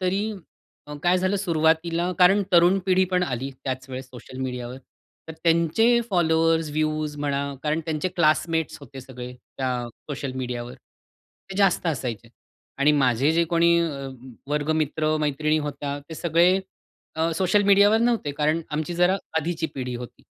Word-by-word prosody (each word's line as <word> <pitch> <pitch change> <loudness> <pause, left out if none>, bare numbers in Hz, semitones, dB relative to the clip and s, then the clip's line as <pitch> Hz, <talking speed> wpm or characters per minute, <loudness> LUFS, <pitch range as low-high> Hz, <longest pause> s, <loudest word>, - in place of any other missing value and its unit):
तरी 195 +4 0 0.6
अ, 150 - -7
काय 180 +1 +3
झालं 185 +2 0
सुरुवातीला 170 -1 +1
कारण 195 +3 +5
तरुण 175 +2 +5
पिढी 185 0 +4
पण 180 0 0
आली, 135 -4 -3
त्याच 130 0 -4
वेळेस 130 0 -6
सोशल 130 +1 -11
मीडियावर 125 -1 -4 0.5
तर 160 - -5
त्यांचे 170 +9 +3
फॉलोवर्स, 165 -2 +2
व्ह्यूज 155 -1 -1
म्हणा 140 -1 -1 0.2
कारण 155 +1 0
त्यांचे 155 +2 -2
क्लासमेट्स 165 -2 +1
होते 135 -1 -10
सगळे, 125 -1 -9 0.3
त्या 130 -1 0 0.4
सोशल 135 -2 -4
मीडियावर. 125 -2 -5 0.8
ते 190 - -6
जास्त 195 -3 +2
असायचे 125 -8 -3 0.5
आणि 150 +2 +4
माझे 135 +1 +2
जे 170 +1 +3
कोणी 170 +1 +3
अ, 140 -5 -3 0.4
वर्ग 150 +1 0
मित्र, 155 0 0
मैत्रिणी 150 +1 +1
होत्या, 145 0 -4
ते 160 - -7
सगळे 170 +4 +3 0.6
अ, 160 +1 +1
सोशल 190 +3 +3
मीडियावर 205 +2 +5
नव्हते, 230 -11 +1
कारण 155 +3 0
आमची 155 +3 -3
जरा 180 +2 +3 0.2
आधीची 165 +1 -2
पिढी 125 -2 -4
होती. 120 0 -9
160 Hz, 150 wpm, -24 LUFS, 140-175 Hz, 0.8 s, कारण